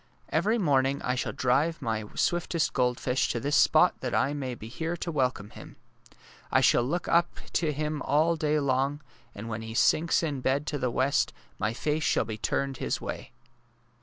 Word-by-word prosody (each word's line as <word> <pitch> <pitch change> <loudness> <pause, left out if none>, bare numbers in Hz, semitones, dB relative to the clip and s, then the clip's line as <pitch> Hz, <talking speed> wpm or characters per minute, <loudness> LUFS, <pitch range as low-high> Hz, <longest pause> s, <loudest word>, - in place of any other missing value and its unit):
Every 205 +9 +1
morning 140 - +2
I 125 - 0
shall 125 - -2
drive 145 +6 +1
my 110 -5 -2
swiftest 170 -1 0
goldfish 125 +1 0
to 120 - -1
this 145 +5 0
spot - - +4
that - - -2
I 140 - +2
may 130 -4 -4
be 110 - -10
here 165 +8 -4
to 170 - -4
welcome 125 -8 -1
him. - - -12 0.8
I - - +5
shall - - +4
look 160 +9 -2
up 170 +1 +2 0.2
to 160 -3 +1
him 150 0 -3
all 155 +4 +2
day 155 -1 +1
long, 140 +1 0 0.3
and 105 +3 -7
when 110 0 -4
he 110 0 -7
sinks 165 +7 +3
to 165 -3 -1
bed 140 +4 0
in 145 - -2
the 125 - +1
west 130 +3 +1 0.3
my 110 +1 -1
face 150 +4 -1
shall - - +1
be 110 -1 -6
turned 135 +3 -1
his - - -2
way! - - -6
140 Hz, 190 wpm, -28 LUFS, 125-155 Hz, 0.8 s, I